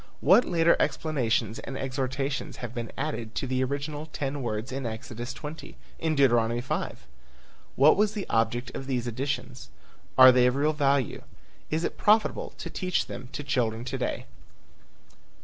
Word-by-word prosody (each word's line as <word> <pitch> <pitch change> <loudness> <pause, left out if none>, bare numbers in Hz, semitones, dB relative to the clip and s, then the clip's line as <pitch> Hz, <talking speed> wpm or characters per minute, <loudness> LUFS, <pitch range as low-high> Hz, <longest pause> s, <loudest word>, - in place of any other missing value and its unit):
What 190 - +6
later 170 -1 +4
explanations 120 -8 0
and 135 - -6
exhortations 135 +1 -2
have 120 -1 -6
been 120 -2 -5
added 120 -6 -4
to - - -1
the 130 0 0
original 145 +3 -3
ten 145 -2 -4
words 110 0 -3
in 135 +1 -3
Exodus 115 +2 -6
20? 150 +4 -8 0.2
In 160 -1 0
Deuteronomy 120 -4 +3
5? 120 - -4 0.7
What 145 +4 +6
was 210 +1 +2
the 205 -3 -4
object 115 +2 0
of 135 - -6
these 125 -3 -1
additions? 130 +1 -4 0.5
Are 130 0 +10
they 125 0 +5
of 125 - +1
real 150 +3 +2
value? 140 -3 +1 0.5
Is 160 +2 -1
it - - -3
profitable 215 +1 +3
to - - -6
teach 185 -2 -1
them 125 +1 -8
to 145 - -4
children 120 -4 -1
to 130 +1 -3
day? 125 - -2
135 Hz, 160 wpm, -27 LUFS, 120-150 Hz, 0.7 s, Are